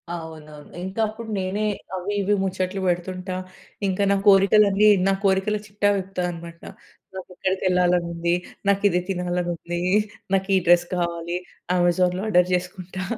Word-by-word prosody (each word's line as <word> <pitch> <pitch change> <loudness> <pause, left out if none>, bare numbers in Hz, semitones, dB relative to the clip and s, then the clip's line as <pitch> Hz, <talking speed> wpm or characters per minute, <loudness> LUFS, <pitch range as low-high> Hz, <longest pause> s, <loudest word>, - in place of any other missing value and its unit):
అవునవును. 155 -3 -10
ఇంకా 190 +4 -6
అప్పుడు 220 +1 -8
నేనే 190 +3 -2 0.3
అవి 185 +3 -3
ఇవి 205 +1 +2
ముచ్చట్లు 190 0 -2
పెడుతుంటా. 185 +1 -2 0.5
ఇంకా 190 +1 0
నా - - +4
కోరికలన్నీ 200 +1 +5 0.2
నా 195 - +3
కోరికల 195 +2 +2
చిట్టా 205 0 +1
విప్పుతా 190 -1 -4
అనమాట. 170 0 -10 0.5
నాకు 190 - -8
ఎక్కడికి 190 +1 -2
వెళ్ళాలని 180 -1 +2
ఉంది, 170 0 0 0.3
నాకు 200 0 +2
ఇది 180 -1 +1
తినాలని 180 -1 -1
ఉంది, 175 +1 -5 0.5
నాకు 195 0 +1
ఈ - - +5
డ్రెస్ 175 0 +5
కావాలి, 170 0 -2 0.4
అమెజాన్‍లో 180 +1 +2
ఆర్డర్ 180 -4 +4
చేసుకుంటా. 180 0 -3
185 Hz, 140 wpm, -23 LUFS, 175-195 Hz, 0.5 s, కోరికలన్నీ